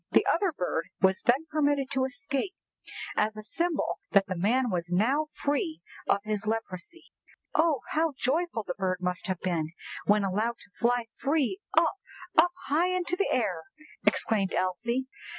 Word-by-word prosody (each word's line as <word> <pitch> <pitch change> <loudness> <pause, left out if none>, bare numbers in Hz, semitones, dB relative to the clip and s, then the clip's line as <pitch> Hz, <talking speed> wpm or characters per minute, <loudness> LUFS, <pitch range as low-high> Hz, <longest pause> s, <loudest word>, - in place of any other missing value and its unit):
The - - +4
other 390 -4 +2
bird 180 - -2
was 190 0 +3
then 260 +6 +3
permitted 285 -3 +1
to 265 -1 +2
escape, 280 +7 -3 0.6
as 215 0 +1
a 215 - -6
symbol 335 +8 -1
that 200 -1 +6
the 185 - -3
man 235 +7 +2
was 175 -1 -2
now 260 +12 +2
free 280 - -1 0.3
of 200 - +3
his 215 -1 -2
leprosy.'" 225 - -4 0.4
"Oh, 315 -3 +3
how 320 -1 +1
joyful 285 -2 0
the 180 - -3
bird 185 -1 -1
must 180 0 -1
have 185 -2 -1
been 165 -3 -1 0.3
when 210 0 +5
allowed 215 +5 0
to - - -17
fly 240 0 +2
free 295 +5 +1 0.2
up—up 355 - +2
high 315 +6 +3
into 360 -1 0
the 400 +2 +1
air!" - - +1 0.4
exclaimed 200 -4 +2
Elsie. 235 +8 0
240 Hz, 155 wpm, -29 LUFS, 195-295 Hz, 0.6 s, that